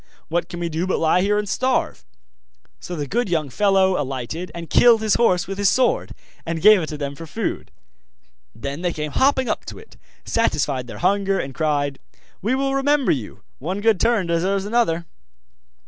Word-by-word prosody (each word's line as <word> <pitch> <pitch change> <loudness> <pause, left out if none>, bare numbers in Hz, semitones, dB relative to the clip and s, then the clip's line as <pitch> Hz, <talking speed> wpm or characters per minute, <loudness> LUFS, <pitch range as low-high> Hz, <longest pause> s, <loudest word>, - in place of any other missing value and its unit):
What 170 +2 -1
can 175 - -7
we 170 - -2
do, 165 +3 -2
but 185 - 0
lie 165 +3 +2
here 205 +2 +2
and 210 0 -1
starve?' 255 +5 -1 0.8
So 180 - -6
the 145 -3 -3
good 230 - -1
young 155 -5 -1
fellow 190 +2 +2
alighted 135 +6 -5
and 170 -1 -6
killed 230 +2 +5
his 215 - +2
horse 185 -7 +2
with 195 +1 -6
his 200 - +4
sword, 255 -2 +1 0.3
and 165 0 -3
gave 210 +2 +7
it 155 - -4
to 150 - -6
them 140 -1 -4
for 165 +3 -10
food. 220 +6 -4 0.9
Then 140 +3 -5
they 175 -1 -1
came 150 -1 -4
hopping 265 - +2
up - - -2
to - - -8
it, 445 - -15 0.3
satisfied 145 - 0
their - - -8
hunger, 195 0 +2
and 135 - -4
cried: 145 -2 -1 0.4
'We 225 +7 +1
will 270 0 0
remember 275 0 +2
you 120 -7 -4 0.2
one 180 +8 -3
good 215 -2 +2
turn 230 -5 +2
deserves 185 +4 0
another! 205 -7 +1
180 Hz, 190 wpm, -21 LUFS, 155-220 Hz, 0.9 s, gave